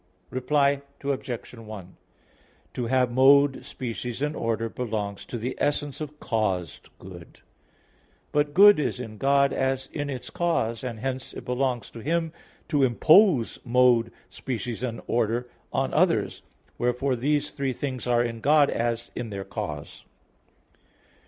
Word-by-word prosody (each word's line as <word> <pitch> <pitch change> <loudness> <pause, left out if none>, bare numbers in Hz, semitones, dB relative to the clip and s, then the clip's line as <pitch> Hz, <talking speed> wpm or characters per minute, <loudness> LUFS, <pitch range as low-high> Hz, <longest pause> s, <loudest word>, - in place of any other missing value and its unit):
Reply 140 +2 +2 0.2
Obj. 130 -4 -3
1: 110 -6 -10 0.8
To 125 - -3
have 125 0 +2
mode, 135 +2 +5
species 125 +1 -5
and 150 +1 -1
order 115 0 -1
belongs 110 -4 -4
to 120 - -5
the 120 +3 -3
essence 145 0 -1
of 150 0 -7
caused 95 - -2
good; 90 -2 -12 0.9
but 145 0 0
good 205 -2 +8
is 145 - -1
in 110 -4 -7
God 140 0 +3
as 135 0 -1
in 145 -2 -3
its 130 -3 -6
cause, 165 - -1
and 115 -4 -5
hence 130 0 -4
it - - -8
belongs 125 -2 -1
to 115 - -9
Him 165 +5 -1 0.3
to 145 -3 +1
impose 140 - +4
mode, 125 -2 +3 0.2
species 120 -2 -5
and 120 -3 -3
order 120 +1 0 0.2
on - - -1
others; - - +2 0.4
wherefore 125 +2 +1
these 145 +4 0
three 140 -2 -2
things 130 -1 -4
are 120 -1 +3
in 115 -1 -4
God 145 +4 +4
as 115 0 -2
in 120 - -4
their 100 -1 -5
cause. 75 -1 -6
125 Hz, 140 wpm, -26 LUFS, 115-140 Hz, 0.9 s, good